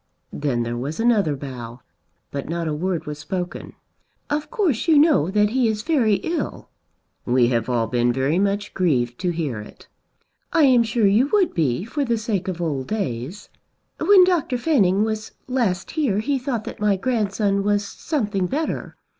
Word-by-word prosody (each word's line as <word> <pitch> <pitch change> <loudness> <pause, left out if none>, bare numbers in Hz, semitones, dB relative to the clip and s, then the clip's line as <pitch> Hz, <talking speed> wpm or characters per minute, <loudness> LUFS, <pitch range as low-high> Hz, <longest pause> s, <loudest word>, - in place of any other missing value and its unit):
Then 135 -5 -1
there 120 +1 -3
was 145 - -4
another 215 -10 +2
bow, 125 -3 -8 0.5
but 140 +1 -5
not 170 0 -2
a 155 - -1
word 175 +2 -2
was 150 -1 -6
spoken. 180 +4 -5 0.6
"Of 295 +1 -1
course 375 - 0
you 320 -2 +5
know 290 - +4
that 210 +1 +2
he 250 -1 +2
is 215 -1 -1
very 255 -10 +2
ill." 330 0 -3 0.5
"We 120 -1 +3
have 115 -1 0
all 120 -2 +1
been 120 +1 +1
very 135 +7 +1
much 200 +1 -1
grieved 125 -10 0
to 180 - 0
hear 155 -9 -2
it." 105 - -12 0.6
"I 330 -2 +4
am 255 -4 +6
sure 225 -1 +1
you 210 +7 +4
would 400 -4 +3
be, 155 +2 0
for 285 +5 -2
the 235 -3 0
sake 210 -4 -2
of 180 -2 -3
old 145 -6 -2
days. 165 - -4 0.5
When 395 -2 +7
Dr. 335 -8 +1
Fanning 215 - +2
was 215 0 -3
last 230 -8 -1
here 280 -11 0
he 270 +6 0
thought 245 -4 -3
that - - -8
my 210 -1 +2
grandson 205 -3 0
was 205 0 0
something 210 - -2
better. 305 - -3
200 Hz, 175 wpm, -22 LUFS, 150-245 Hz, 0.6 s, When